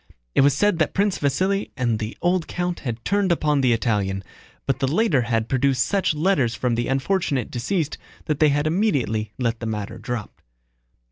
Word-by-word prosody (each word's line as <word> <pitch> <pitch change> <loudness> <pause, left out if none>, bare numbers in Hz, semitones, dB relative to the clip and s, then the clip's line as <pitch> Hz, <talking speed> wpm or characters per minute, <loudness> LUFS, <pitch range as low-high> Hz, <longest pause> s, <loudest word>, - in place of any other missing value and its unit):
It - - +4
was 140 0 +4
said 205 -2 +2
that 155 - +1
Prince 200 0 +1
Vasíli 190 +8 0
and 120 -5 0
the 110 +1 -5
old 175 -1 +1
count 175 0 -2
had 120 -3 -5
turned 200 -2 +2
upon 150 -4 +2
the 130 -2 +3
Italian, 105 -4 0 0.4
but 135 0 0
the 135 - +1
latter 165 - +3
had 115 -1 0
produced 130 +1 +2
such 195 -5 +1
letters 150 - +1
from 125 +1 0
the 120 +1 -1
unfortunate 135 - 0
deceased 155 +6 -2 0.3
that 150 -4 -1
they 155 - +5
had 145 +1 +1
immediately 140 - 0
let 115 -3 -1
the 115 - -4
matter 105 -2 -4
drop. 120 -4 -5
140 Hz, 185 wpm, -23 LUFS, 115-175 Hz, 0.4 s, they